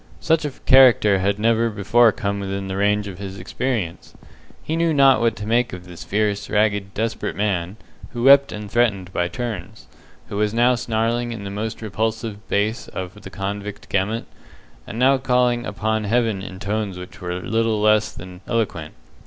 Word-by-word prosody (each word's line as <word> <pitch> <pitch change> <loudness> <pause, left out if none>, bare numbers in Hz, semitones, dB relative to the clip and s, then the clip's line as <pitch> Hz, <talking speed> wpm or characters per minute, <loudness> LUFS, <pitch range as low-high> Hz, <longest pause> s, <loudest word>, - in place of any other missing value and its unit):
Such 160 -1 +1
a - - 0 0.2
character 120 -7 +6
had 100 +2 0
never 115 +2 +2
before 110 +3 +4
come 100 0 -3
within 95 0 -4
the 95 - -3
range 105 +1 +1
of 95 -2 -8
his 100 -1 -7
experience. 95 -2 -3 0.5
He 160 - -2
knew 165 -1 +1
not 135 -3 +5
what 115 -2 +2
to 105 - -7
make 120 +1 +1
of 90 -1 -8
this 90 -2 -10
fierce, 105 0 -1
ragged, 100 -1 0
desperate 115 +1 -2
man, 95 -2 -1 0.3
who 120 -1 -5
wept 140 +1 +7
and 105 -1 -7
threatened 100 -6 +1
by 85 - 0
turns 110 -1 -6 0.4
who 100 - -4
was 105 +1 0
now 120 +2 +4
snarling 120 0 -1
in 110 -3 -6
the 100 - -6
most 110 +3 -4
repulsive 110 -1 -3
bass 105 +3 -1
of 95 +3 -7
the - - -9
convict 100 +1 -5
gamut, 105 +4 -1 0.6
and 110 - -7
now 130 +2 +4
calling 125 -2 +1
upon 110 +1 -1
Heaven 110 -2 +1
in 95 -1 -8
tones 100 -1 -3
which 90 +1 -10
were 90 0 -3
little 115 +2 0
less 105 0 +3
than 90 0 -11
eloquent. 115 -2 -2
105 Hz, 180 wpm, -22 LUFS, 100-115 Hz, 0.6 s, wept